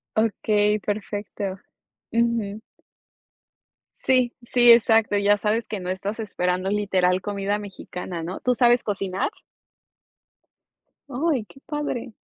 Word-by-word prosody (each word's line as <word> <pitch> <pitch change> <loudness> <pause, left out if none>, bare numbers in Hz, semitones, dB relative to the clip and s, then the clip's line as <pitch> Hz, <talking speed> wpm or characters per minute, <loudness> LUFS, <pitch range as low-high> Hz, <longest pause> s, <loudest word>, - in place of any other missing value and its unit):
Okey, 210 -1 +2
perfecto. 205 -1 -4 0.5
Ujú. 230 -3 0 1.4
Sí, 255 -2 +2
sí, 240 0 +6
exacto. 225 -2 +5
Ya 205 +1 +4
sabes 220 +3 0
que 210 -3 -4
no 180 0 -5
estás 200 +4 -3
esperando, 185 -2 -1
literal, 190 -3 +1
comida 200 0 -2
mexicana, 185 -3 -7
¿no? 180 +3 -5
¿Tú 250 - +2
sabes 240 +1 +4
cocinar? 195 - -2 1.8
Ay, 275 -3 0
qué 270 - -17
padre. 270 -6 -4
210 Hz, 110 wpm, -24 LUFS, 195-235 Hz, 1.8 s, sí